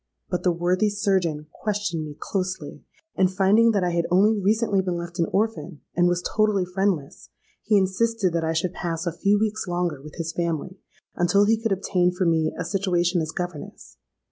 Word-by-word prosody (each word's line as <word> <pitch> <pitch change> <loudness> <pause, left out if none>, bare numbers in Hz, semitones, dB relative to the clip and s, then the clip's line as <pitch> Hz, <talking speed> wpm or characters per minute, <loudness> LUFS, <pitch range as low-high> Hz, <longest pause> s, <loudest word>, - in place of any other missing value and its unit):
But 180 - -1
the 180 - +2
worthy 180 +4 +1
surgeon 190 -7 0
questioned 205 -6 -2
me 150 -1 -8
closely; 185 -1 -4 0.3
and 185 -1 +3
finding 200 +4 +4
that 205 -4 +1
I 175 - +1
had 170 0 0
only 205 +5 +4
recently 205 0 +1
been 180 -2 -2
left 170 0 -7
an 170 - +2
orphan, 205 -6 -1
and 175 0 +4
was 175 0 0
totally 215 -3 +1
friendless, 180 -5 -2 0.3
he 215 -1 +3
insisted 195 0 +1
that 170 -1 0
I 160 0 0
should 165 +2 -1
pass 165 0 -3
a 170 - -1
few 200 +4 +2
weeks 215 -1 -1
longer 175 -5 -2
with 150 +1 -11
his 165 -1 -4
family, 170 +2 -3 0.4
until 180 +4 +3
he 220 +1 +2
could 225 -2 -1
obtain 180 -2 +1
for 180 +1 -1
me 160 -2 +2
a - - -3
situation 175 -1 +1
as 155 - -3
governess. 175 - -7
180 Hz, 190 wpm, -24 LUFS, 170-200 Hz, 0.4 s, finding